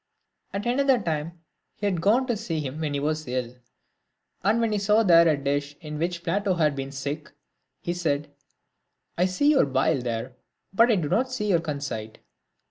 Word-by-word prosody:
At 200 +1 -4
another 265 +2 +3
time, 165 -2 -4 0.3
he 205 - -5
had 185 -5 0
gone 225 +8 +3
to 240 -2 0
see 195 -7 -3
him 145 0 -5
when 150 -3 -2
he - - 0
was 155 +1 -2
ill, 125 -1 -2 0.9
and 210 +4 +3
when 230 -1 +1
he 210 - +1
saw 210 +3 +3
there 170 -4 +6
a 155 -2 +3
dish 145 +1 -2
in 150 -2 -7
which 170 +1 -2
Plato 195 +2 0
had 155 -4 +2
been 135 0 -5
sick, 140 +3 -5 0.5
he 175 - -1
said, 150 -4 -2 0.4
" - - -49
I 180 - +4
see 240 +11 +2
your 275 - +4
bile 135 0 +1
there, 120 +1 -3 0.4
but 230 +5 +5
I 225 - +5
do 170 -6 -1
not 245 - +1
see 210 -5 -2
your 170 -4 +3
conceit." 140 -8 -5
165 Hz, 195 wpm, -25 LUFS, 145-205 Hz, 0.9 s, there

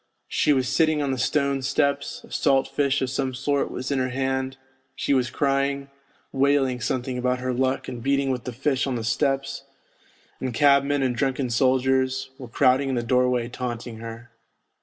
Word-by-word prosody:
She 150 - +2
was 130 -3 +2
sitting 155 0 +2
on 140 - -1
the 130 - -2
stone 140 0 +1
steps, 140 +2 -1
a - - -16
salt 135 0 +2
fish 140 -1 0
of 130 - -1
some 130 -1 -2
sort 140 +2 0
was 130 +3 -5
in 140 - +1
her 130 0 0
hand; 130 +1 -2 0.4
she - - 0
was 130 -2 +2
crying, 140 0 0 0.4
wailing 135 -2 +2
something 125 +1 -2
about 125 0 +1
her 130 0 -2
luck 130 +1 0
and 120 - -6
beating 140 +1 +1
with 125 -2 -3
the 125 - -3
fish 135 +2 0
on 130 - -1
the 115 - -3
steps, 135 +4 -1 0.8
and 130 -3 -3
cabmen 140 0 +4
and 125 -2 0
drunken 135 -1 -1
soldiers 130 +1 +1
were 130 - -8
crowding 130 +3 +2
in 130 - 0
the 120 - -1
doorway 125 0 +2
taunting 120 -2 -5
her. 115 +1 -9
130 Hz, 180 wpm, -24 LUFS, 125-140 Hz, 0.8 s, cabmen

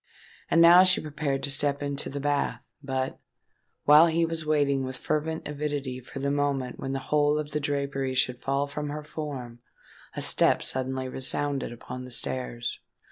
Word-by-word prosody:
And 165 - +5
now 175 +2 +9
she 185 -1 +5
prepared 150 -2 -3
to 140 - +1
step 145 0 +2
into 140 0 -3
the 140 - -5
bath: 145 0 -1 0.2
but, 130 -1 -3 0.6
while 150 +3 +7
he 165 0 +2
was 165 -1 -4
waiting 140 -3 +2
with 130 0 -4
fervent 160 +1 -2
avidity 145 -3 -4
for 130 +2 -11
the 140 +1 -1
moment 140 -3 -1
when 135 0 -4
the - - -1 0.2
whole 150 0 +3
of 150 -1 -4
the 150 - -1
drapery 140 -2 -2
should 125 -1 0
fall 140 +2 0
from 145 +1 -5
her 150 +1 -5
form, 140 -6 -7 0.6
a - - -3
step - - +4
suddenly 130 0 -2
resounded 135 +1 +1
upon 125 +1 -8
the 125 - -9
stairs. 120 -1 -3
140 Hz, 175 wpm, -27 LUFS, 130-150 Hz, 0.6 s, now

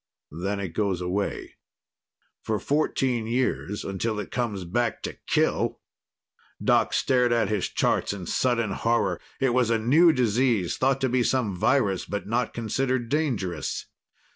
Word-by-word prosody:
Then 95 +6 -3
it 95 -2 -3
goes 95 +1 -1
away 90 +3 -3 0.8
for 110 - -1
fourteen 130 -5 0
years, 115 -4 -1
until 105 +3 -2
it 105 - -6
comes 110 -6 -2
back 115 +6 -1
to - - -5
kill! - - +1 0.8
Doc - - +3
stared 125 -2 +2
at 115 -4 +2
his 105 -3 -1
charts - - +1
in 100 -3 -6
sudden 115 +1 0
horror. 100 -4 0 0.2
It 135 -2 +2
was 125 -2 +2
a 115 - +3
new 150 +10 +5
disease 120 - +1
thought 135 0 +1
to 130 - +2
be 125 +1 +2
some 120 -5 0
virus, 105 -2 +1
but 105 0 -4
not 120 +4 0
considered 120 +1 -1
dangerous. 115 - -1
115 Hz, 145 wpm, -26 LUFS, 100-125 Hz, 0.8 s, new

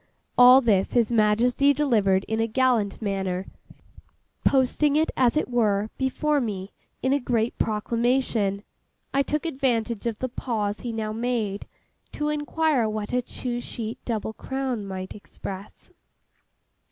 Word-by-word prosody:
All 250 +2 +8
this 205 -6 +2
His 235 -2 +2
Majesty 235 +5 +3
delivered 215 -10 +2
in 220 0 -2
a 225 - +1
gallant 230 -4 +1
manner; 190 -2 -2 1.0
posting 280 +2 +3
it, 315 +1 +2
as 255 +2 +3
it - - +1
were, 215 -4 +1
before 290 +2 +1
me, 200 -4 -4 0.3
in 260 +1 +2
a 285 - +2
great 240 -3 0
proclamation. 225 -2 0 0.5
I 275 - +3
took 300 +3 -2
advantage 240 -7 -1
of 225 -3 -2
the 255 - -2
pause 215 -4 -2
he 240 - -4
now 220 -1 -3
made, 225 -4 -2 0.5
to 300 0 -1
inquire 300 -4 +1
what 215 +1 -4
a 250 - +2
'two 245 0 -5
sheet 230 -1 -6
double 220 -2 -3
crown' 260 -5 -3
might 190 -1 -6
express? 200 -1 -9
235 Hz, 140 wpm, -25 LUFS, 210-260 Hz, 1.0 s, All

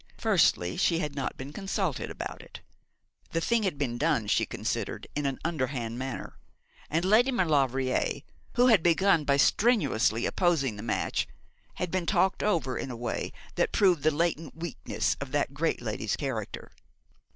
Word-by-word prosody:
Firstly, 90 +1 +2
she 170 - +2
had 150 -4 -2
not 135 -2 -3
been 135 +2 -7
consulted 195 - -2
about - - -6
it. - - -12 0.7
The 165 - +2
thing 230 +7 +1
had 190 -8 -1
been 120 -4 -2
done, 150 -8 +2
she 105 - +1
considered, - - -3
in 145 -1 0
an 135 - -2
underhand 130 -7 -2
manner; 130 -1 -6 0.5
and 165 +4 0
Lady 225 +7 +5
Maulevrier, 135 - +1 0.3
who 245 0 +5
had 225 -8 +6
begun 170 -1 +3
by 140 0 +3
strenuously 140 - +3
opposing 160 - +1
the 105 - -7
match, 110 0 -1 0.5
had 180 -2 -3
been 185 -2 -1
talked 190 -1 +2
over 165 -11 0
in - - -4
a 125 - -5
way 120 -1 -3 0.2
that - - +1
proved 180 -7 +3
the 155 - +4
latent 160 -1 -1
weakness 165 -3 -2
of - - -5
that - - 0
great - - -1
lady's - - -2
character. - - -5
155 Hz, 160 wpm, -28 LUFS, 130-180 Hz, 0.7 s, had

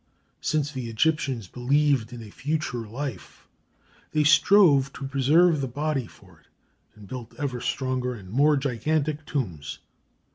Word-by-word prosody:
Since 150 -2 0
the 130 -5 -5
Egyptians 130 - 0
believed 130 0 +1
in 120 -2 -8
a 105 - -12
future 140 -6 -3
life 125 -2 -7 0.7
they 155 - +3
strove 150 -2 +5
to 135 - -7
preserve 150 +4 +3
the 135 - -1
body 140 -1 -2
for 95 -6 -19
it, 80 - -30 0.5
and 105 -2 -14
built 125 -1 -8
ever 130 -5 -3
stronger 130 -2 -2
and 100 -4 -11
more 145 +5 +4
gigantic 150 +3 -1
tombs. 85 - -3
135 Hz, 140 wpm, -25 LUFS, 120-150 Hz, 0.7 s, strove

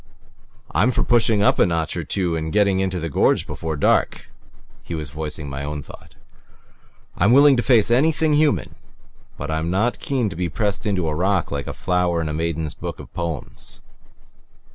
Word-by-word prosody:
"I'm 115 - +3
for 130 - +1
pushing 115 -3 +3
up - - +3
a - - +6
notch 80 -2 -1
or - - -3
two 90 -4 -1
and 80 0 -3
getting 100 -1 +2
into 95 -1 -1
the 85 - -3
gorge 75 - +2
before 80 -1 -4
dark," - - +1 0.5
he 85 - -6
was 75 -3 -5
voicing 75 -1 -5
my 70 0 -5
own 75 0 -4
thought. - - -14 1.0
"I'm 100 - +3
willing 140 +1 +7
to - - +2
face 115 -2 +3
anything 155 +4 +3
human 145 - +1 0.6
but 75 +2 -5
I'm 80 +1 -1
not 105 +7 0
keen 130 -5 -1
to 85 - -8
be 90 0 -2
pressed 105 +3 -2
into 95 -5 0
a 75 - -1
rock 95 +2 0
like 70 -1 -4
a - - -3
flower 90 -2 0
in 80 -2 -2
a - - -3
maiden's 80 -1 -2
book - - -7
of - - -12
poems." 85 -5 -5
90 Hz, 185 wpm, -21 LUFS, 80-110 Hz, 1.0 s, willing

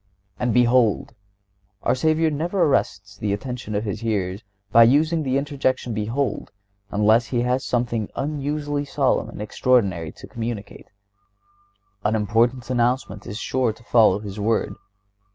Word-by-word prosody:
"And 125 -1 0
behold!" 120 -2 +3 0.7
Our - - +2
Savior 155 +4 +2
never 170 +6 0
arrests 100 -8 0
the 100 -1 -1
attention 120 0 -5
of 105 - 0
His 105 -1 -3
hearers 100 -4 -2 0.3
by 115 - +7
using 155 +6 +3
the 135 -2 0
interjection, 135 -4 -1
behold, 115 +6 -2 0.4
unless 110 +3 +3
when 120 -2 +1
He - - -1
has 125 +1 0
something 120 -3 -1
unusually 145 0 -2
solemn 140 -1 0
and - - -9
extraordinary 100 -7 +1
to - - -12
communicate. 115 -3 -6 1.2
An 105 +1 +1
important 115 +4 +1
announcement 120 -4 0
is 105 - -5
sure 125 -1 0
to 120 - -19
follow 110 -5 +4
this 105 0 -7
word. 105 -1 0
120 Hz, 140 wpm, -23 LUFS, 105-135 Hz, 1.2 s, by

